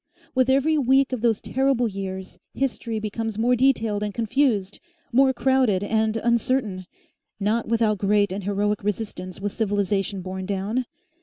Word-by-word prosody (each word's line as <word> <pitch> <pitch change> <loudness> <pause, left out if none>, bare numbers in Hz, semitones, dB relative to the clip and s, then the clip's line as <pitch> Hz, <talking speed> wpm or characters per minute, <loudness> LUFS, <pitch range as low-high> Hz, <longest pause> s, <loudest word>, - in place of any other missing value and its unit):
With 255 0 +2
every 285 +4 +3
week 270 0 +3
of 250 - -2
those 225 -3 +2
terrible 265 -2 +1
years 190 -2 -6 0.2
history 235 -4 -2
becomes 215 0 -4
more 240 +3 +3
detailed 230 -5 +2
and 210 0 -2
confused, 225 -4 0 0.3
more 265 +2 +5
crowded 255 -6 +2
and 220 +1 +1
uncertain. 230 -4 0 0.5
Not 215 +3 0
without 220 -3 +1
great 205 0 +2
and 195 +1 -4
heroic 205 +1 -1
resistance 200 -3 -4
was 205 0 -3
civilisation 200 -2 -1
borne 185 0 -5
down. 205 +6 -1
220 Hz, 145 wpm, -24 LUFS, 200-245 Hz, 0.5 s, more